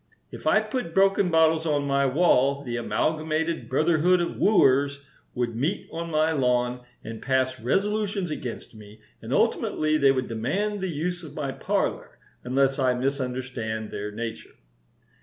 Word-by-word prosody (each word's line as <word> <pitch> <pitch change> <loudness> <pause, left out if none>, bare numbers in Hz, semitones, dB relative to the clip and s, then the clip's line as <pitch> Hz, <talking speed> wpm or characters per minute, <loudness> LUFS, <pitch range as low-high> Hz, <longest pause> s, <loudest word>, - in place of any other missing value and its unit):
If - - -7
I - - +5
put 245 -11 -4
broken 195 -1 +3
bottles 160 0 +3
on 145 -2 +1
my 140 0 +2
wall 140 -2 +3
the 120 -3 -4
Amalgamated 155 +2 -1
Brotherhood 165 +5 +3
of 175 - -2
Wooers 140 -8 +3 0.3
would 120 -2 -2
meet 150 - -2
on 170 +1 -4
my 155 0 +2
lawn 125 -3 +1 0.2
and 115 0 -7
pass 130 -1 0
resolutions 200 - -1
against 125 -6 -6
me, 105 0 -14 0.2
and - - -8
ultimately 155 0 +1
they 140 -1 +5
would 130 -1 -1
demand 190 - -2
the 190 - -2
use 175 +3 -3
of 155 -3 -11
my 140 -3 -3
parlor, - - -2 0.3
unless 135 +2 +1
I 130 -2 +2
misunderstand 125 -4 -3
their 105 +1 -5
nature. 115 +1 -7
140 Hz, 150 wpm, -25 LUFS, 125-165 Hz, 0.3 s, I